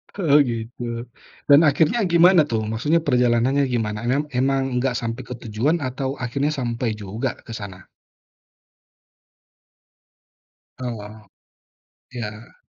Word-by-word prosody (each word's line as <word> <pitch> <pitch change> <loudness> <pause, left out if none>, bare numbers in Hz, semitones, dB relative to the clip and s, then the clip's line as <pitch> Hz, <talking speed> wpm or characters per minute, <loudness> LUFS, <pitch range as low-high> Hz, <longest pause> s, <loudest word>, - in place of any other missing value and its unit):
Oh 150 -7 +4
gitu, 120 -1 -2 0.5
dan 140 - +9
akhirnya 155 - +2
gimana 170 0 +6
tuh 110 -4 -1
maksudnya 150 +9 +1
perjalanannya 125 +1 +2
gimana 110 -4 -2
em 140 +4 +1 0.2
emang 135 0 +2 0.2
nggak 125 -1 0
sampai 115 +2 -3
ke - - -5
tujuan 130 +9 0
atau 130 +2 -3
akhirnya 140 +4 -1
sampai 120 -2 -2
juga 110 +6 -3
ke - - -8
sana? 95 -2 -9 2.9
Oh, 110 -3 -6 0.9
iya. 110 -2 -7
125 Hz, 110 wpm, -22 LUFS, 115-140 Hz, 2.9 s, dan